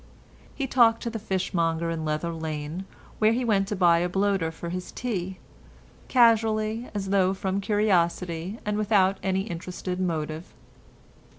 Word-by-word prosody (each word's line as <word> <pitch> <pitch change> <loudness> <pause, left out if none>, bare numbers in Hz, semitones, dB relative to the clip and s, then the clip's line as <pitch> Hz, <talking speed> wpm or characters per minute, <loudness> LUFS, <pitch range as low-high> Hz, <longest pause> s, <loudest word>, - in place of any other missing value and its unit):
He 275 - -2
talked 235 -3 +4
to 235 - -2
the 225 - -4
fishmonger 170 -4 -1
in 165 -1 -3
Leather 155 +2 -2
Lane, 160 +2 -5 0.3
where 215 +1 +4
he 250 +1 -1
went 200 -4 +2
to 210 - -2
buy 175 -3 +4
a 175 +1 0
bloater 195 -3 +1
for 165 +1 -7
his 180 +1 -5
tea, 190 -6 -3 0.7
casually 225 -1 +3
as 195 -1 -3
though 190 -1 +3
from 190 +1 -2
curiosity 185 -3 0
and 210 0 -1
without 200 -2 +3
any 190 0 0
interested 180 0 -5
motive. 160 -2 -3
190 Hz, 150 wpm, -26 LUFS, 170-215 Hz, 0.7 s, talked